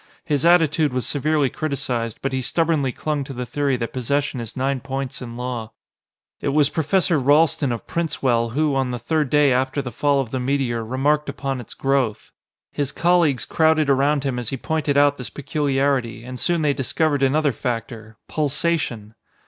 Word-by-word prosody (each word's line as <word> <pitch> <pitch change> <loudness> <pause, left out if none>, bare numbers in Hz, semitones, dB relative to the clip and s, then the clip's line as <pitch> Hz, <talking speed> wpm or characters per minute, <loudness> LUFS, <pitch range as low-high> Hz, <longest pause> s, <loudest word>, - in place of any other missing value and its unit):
His 145 0 0
attitude 160 -4 +4
was 125 -1 -1
severely 145 -1 +1
criticized, 125 -7 -2
but 135 -1 -1
he 130 - 0
stubbornly 155 0 +1
clung 150 +2 -2
to 135 - -8
the 125 0 -4
theory 140 +1 0
that 115 -1 -4
possession 135 +2 -1
is 115 +1 -7
nine 135 +1 0
points 135 0 -5
in 120 -1 -7
law. 120 -3 -4 0.7
It - - -4
was 140 0 +3
Professor 170 0 +1
Ralston 145 +1 +3
of 115 - -4
Princewell 125 -8 0
who, 150 +1 +1
on 135 -1 0
the 125 - -3
third 150 +4 -1
day 145 -2 +4
after 130 +2 0
the 130 -3 -4
fall 145 +1 +1
of 125 -4 -3
the 130 - -2
meteor, 125 -3 -1
remarked 145 +5 0
upon 135 -2 -3
its 115 - -12
growth. 135 -6 0 0.4
His 145 -1 -2
colleagues 170 -6 +2
crowded 160 -2 +3
around 140 +1 +2
him 130 -3 -1
as 120 - -3
he 135 - -3
pointed 150 0 -1
out 145 0 +4
this 125 - -5
peculiarity, 140 -5 -1
and 125 +1 -7
soon 170 -2 +1
they 145 -1 +3
discovered 145 +2 0
another 145 +2 +3
factor 115 -2 -5
pulsation! 150 -7 -1
140 Hz, 180 wpm, -22 LUFS, 125-150 Hz, 0.7 s, attitude